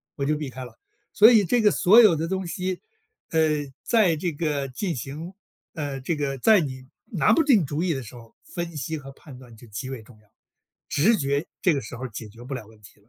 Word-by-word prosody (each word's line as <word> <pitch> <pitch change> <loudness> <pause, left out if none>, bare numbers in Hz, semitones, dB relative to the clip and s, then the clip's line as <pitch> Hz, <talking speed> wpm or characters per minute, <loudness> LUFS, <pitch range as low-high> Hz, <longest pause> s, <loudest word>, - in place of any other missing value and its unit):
我 140 - -2
就 150 +2 +1
避 150 -3 -4
开 130 0 -8
了。 - - -15 0.3
所 220 +4 +8
以 215 -4 +5
这 245 +6 +2
个 210 - +5
所 205 +4 +6
有 210 -7 +6
的 160 +1 -2
东 190 0 -3
西， 185 +2 -3 0.5
呃， 160 -2 +3 0.4
在 210 -8 +3
这 170 +2 -2
个 145 -3 -2
进 165 +7 -3
行 150 +8 -7 0.4
呃， 145 -4 -4
这 160 +6 -1
个 140 -2 -3
在 215 - +5
你 130 -3 -6 0.2
拿 205 +1 +2
不 320 - +4
定 245 - +4
主 150 +3 -2
意 180 -3 +1
的 135 - -4
时 120 0 -11
候， 115 -1 -15
分 170 -1 -6
析 150 +3 -3
和 135 -2 -10
判 135 -1 -14
断 125 -3 -14
就 115 +2 -15
极 120 +5 -6
为 130 -4 -6
重 110 0 -18
要。 105 - -28 0.6
直 215 +10 +3
觉 140 +2 -1
这 175 -5 +3
个 140 - -2
时 - - -9
候 130 +1 -6
解 115 - -8
决 115 +3 -14
不 135 +2 -6
了 120 -5 -7
问 110 0 -19
题。 105 - -17
150 Hz, 250 characters per minute, -24 LUFS, 130-180 Hz, 0.6 s, 所